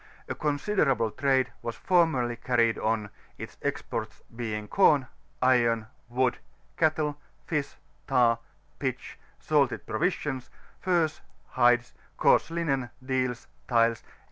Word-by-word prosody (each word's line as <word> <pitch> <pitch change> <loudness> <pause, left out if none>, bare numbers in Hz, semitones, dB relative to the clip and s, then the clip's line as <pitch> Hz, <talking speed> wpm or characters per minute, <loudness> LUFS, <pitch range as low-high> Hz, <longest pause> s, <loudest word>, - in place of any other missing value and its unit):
A - - -2
considerable 145 - +1
trade 130 0 +1
was 115 -1 -4
formerl 165 -9 +2
v 120 - -4
carried 120 -2 +2
on, 110 -2 -1 0.3
its - - -9
exports - - -4
being 110 -3 -4
com, 150 - +4 0.4
iron^ 115 -4 +3 0.2
wood, 125 0 +1 0.4
cattle, 155 -2 +1 0.3
fish, 150 -3 -2 0.3
tar, 120 -4 +3 0.4
pitch, - - -4 0.2
salted 140 -8 +1
provisions, 135 - -2 0.3
furs, 170 -4 +1 0.3
hides, 120 0 +3 0.2
coarse - - +4
Imen, 145 -7 -1 0.2
deals, 130 -2 -1 0.2
tiles, 115 -2 +3
&c. - - -28
130 Hz, 115 wpm, -28 LUFS, 115-150 Hz, 0.4 s, com